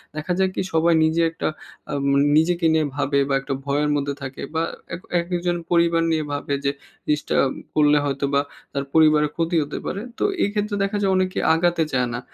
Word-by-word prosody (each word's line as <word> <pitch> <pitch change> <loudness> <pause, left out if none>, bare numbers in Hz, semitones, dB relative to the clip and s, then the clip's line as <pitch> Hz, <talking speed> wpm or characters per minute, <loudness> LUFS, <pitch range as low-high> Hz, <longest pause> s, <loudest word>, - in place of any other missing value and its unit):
দেখা 155 +4 -2
যায় 190 0 +3
কি, - - -1
সবাই 165 +1 +3
নিজে 160 +1 +2
একটা 165 - -3 0.4
আম 140 -1 -2
এ - - +4 0.2
নিজেকে 170 +2 +2
নিয়ে 160 -1 +2
ভাবে 140 0 +1
বা - - +1
একটা 135 - -4
ভয়ের 145 +1 +1
মধ্যে 140 0 -1
থাকে 135 -1 -7
বা 160 - +1 0.3
এক 170 - -10 0.2
একেকজন 175 0 -1
পরিবার 170 -1 +3
নিয়ে 160 -1 +1
ভাবে; 145 0 -3
যে 140 - +3 0.3
জিনিসটা 150 -1 -1 0.4
করলে 150 -1 +5
হয়তোবা 140 0 0 0.3
তার 140 - -1
পরিবারের 155 -2 +4
ক্ষতি 165 +1 -1
হতে 145 - -6
পারে। 200 - -3 0.2
তো - - 0 0.2
এই - - +2
ক্ষেত্রে 210 0 -1
দেখা 200 +1 -1
যায় 195 -1 +2
অনেকে 185 0 0 0.2
আগাতে 170 0 +2
চায় 125 -1 +1
না। 120 - -3
160 Hz, 195 wpm, -22 LUFS, 145-175 Hz, 0.4 s, করলে